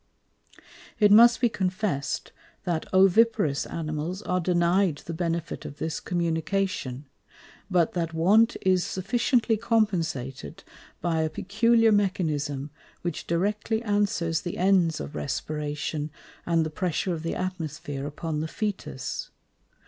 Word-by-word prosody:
It 210 -2 +5
must 235 +3 +8
be 245 - +5
confess'd, 185 -8 -2 0.3
that 170 -4 -2
Oviparous 195 -4 +4
Animals 160 +4 -4
are 180 0 0
denied 175 -1 +2
the 165 - -5
benefit 170 -1 -3
of 145 - -8
this 160 +1 -3
Communication; 170 -5 -2 0.6
but 175 -4 +2
that 170 -2 -1
want 200 +8 +4
is 185 -1 +3
sufficiently 225 +4 +1
compensated 170 - -1 0.4
by 165 -2 +1
a 160 - 0
peculiar 225 +6 +3
Mechanism, 150 -8 0 0.3
which 175 -3 -4
directly 210 +6 0
answers 200 -6 0
the 175 - -5
ends 180 -4 +3
of 150 - -6
Respiration, 150 +1 -3 0.4
and 165 -2 +2
the 155 - -4
pressure 180 +2 -1
of 160 - -4
the 165 - -3
Atmosphere 155 -6 -4
upon 150 +1 -4
the 155 - -2
Fœtus. 200 - -4
175 Hz, 120 wpm, -26 LUFS, 155-200 Hz, 0.6 s, must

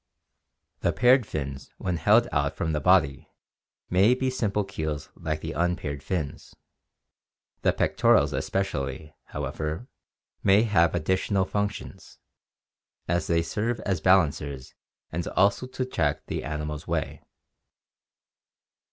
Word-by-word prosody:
The - - +1
paired 125 0 +4
fins 70 -3 -5
when 90 -2 -2
held 110 +9 +4
out 70 +1 0
from 80 - -1
the 75 - 0
body 70 +1 +3 0.6
may 100 +7 +4
be 130 0 -1
simple 105 -5 0
keels 80 -6 -4
like 75 -1 -4
the 80 - -4
unpaired 85 -5 -1
fins; 80 -7 -4 1.1
the - - +3
pectorals - - +3
especially, 75 -6 -2
however, 80 +10 -4 0.5
may 100 +2 +5
have 85 -7 +3
additional 95 +3 +1
functions, 100 -1 -4 0.9
as 85 +1 0
they 85 -1 +2
serve 110 +8 -2
as 95 -6 -1
balancers 75 -7 +2 0.4
and 85 +1 -3
also 100 +6 +2
to 130 0 -3
check 80 - -1
the - - -4
animal's 75 -1 -4
way. - - -2
85 Hz, 115 wpm, -26 LUFS, 75-100 Hz, 1.1 s, may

